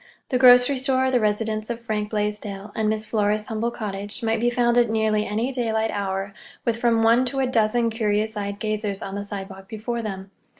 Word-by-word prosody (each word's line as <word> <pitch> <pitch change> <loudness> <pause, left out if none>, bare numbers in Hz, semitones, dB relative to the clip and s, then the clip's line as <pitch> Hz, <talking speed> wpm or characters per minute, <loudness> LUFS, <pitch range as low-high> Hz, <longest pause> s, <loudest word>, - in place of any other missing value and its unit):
The 250 - +1
grocery 250 +1 +7
store, 260 0 +1
the 250 - +3
residence 215 0 -1
of 235 -1 -3
Frank 215 -2 -3
Blaisdell, 210 -1 -3
and 215 -1 0
Miss 215 0 -1
Flora's 210 -1 0
humble 225 +1 -2
cottage 205 0 -4
might 225 0 +1
be 240 +2 +2
found 240 -1 +2
at 240 -2 +3
nearly 220 -1 +1
any 220 +6 -1
daylight 225 -3 0
hour 195 0 -3 0.3
with 230 -1 +1
from 230 -1 +2
one 230 +3 +5
to 255 +2 -3
a 265 - +2
dozen 230 -1 +2
curious 220 -1 0
eyed 200 -1 -3
gazers 215 -2 -2
on 195 - -6
the 200 0 -4
sidewalk 195 -1 -7
before 230 +2 -3
them. 195 -3 -6
220 Hz, 200 wpm, -23 LUFS, 210-235 Hz, 0.3 s, grocery